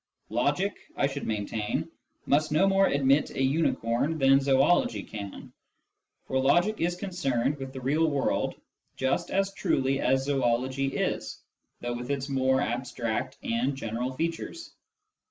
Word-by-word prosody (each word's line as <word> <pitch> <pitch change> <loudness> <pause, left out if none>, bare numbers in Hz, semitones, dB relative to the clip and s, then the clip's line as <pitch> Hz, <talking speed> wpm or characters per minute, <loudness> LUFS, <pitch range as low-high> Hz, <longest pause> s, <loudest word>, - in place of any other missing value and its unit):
Logic, 185 +8 +1 0.2
I - - +3
should 140 0 -3
maintain, 105 0 -2 0.4
must 150 +2 +2
no 155 +6 +4
more 195 0 +4
admit 140 +1 +3
a 135 - -2
unicorn 135 0 +1
than 135 -1 +5
zoology 135 - +3
can; 100 -2 -8 0.7
for 130 - 0
logic 175 +11 +3
is 175 +1 +1
concerned 150 -8 -1
with 135 -1 -6
the 130 -1 -7
real 150 +5 +2
world 140 -2 0 0.4
just 130 0 0
as 195 0 0
truly 135 -8 +1
as 135 +1 +2
zoology, 130 0 +1 0.9
though 120 0 -2
with 120 +1 -6
its 140 0 -2
more 130 -1 +2
abstract 120 +1 -2
and 120 +4 0
general 120 +1 -3
features. 165 - -4
135 Hz, 135 wpm, -28 LUFS, 125-155 Hz, 0.9 s, than